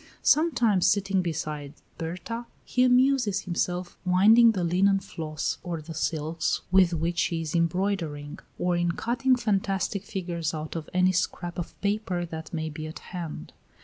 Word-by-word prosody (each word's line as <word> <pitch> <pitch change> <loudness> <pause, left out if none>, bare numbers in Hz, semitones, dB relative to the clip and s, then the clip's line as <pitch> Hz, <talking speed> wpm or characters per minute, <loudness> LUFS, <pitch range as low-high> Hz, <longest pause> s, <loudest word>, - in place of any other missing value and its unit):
Sometimes, 240 - +3
sitting 195 -2 +2
beside 150 -4 -4 0.2
Berta, 185 +8 -5 0.2
he 250 - 0
amuses 250 -5 +3
himself 180 0 -2
winding 215 +6 +6
the 185 -4 -1
linen 195 +3 +3
floss 155 -5 -4
or 170 -2 -4
the 160 +2 -8
silks 160 +1 -1
with 185 -2 +5
which 170 +1 -1
she 165 +1 0
is 160 -1 -4
embroidering, 170 -4 -1 0.2
or 180 0 +1
in 175 0 +1
cutting 250 +6 +1
fantastic 200 -4 -1
figures 170 -5 -3
out 155 +1 -5
of 160 -2 -5
any 185 0 +3
scrap 175 -1 -2
of 175 - -7
paper 200 -4 -1
that 160 -1 -7
may 160 -2 -2
be 155 0 -6
at 155 - -8 0.2
hand. 165 - -6
180 Hz, 150 wpm, -27 LUFS, 165-200 Hz, 0.2 s, winding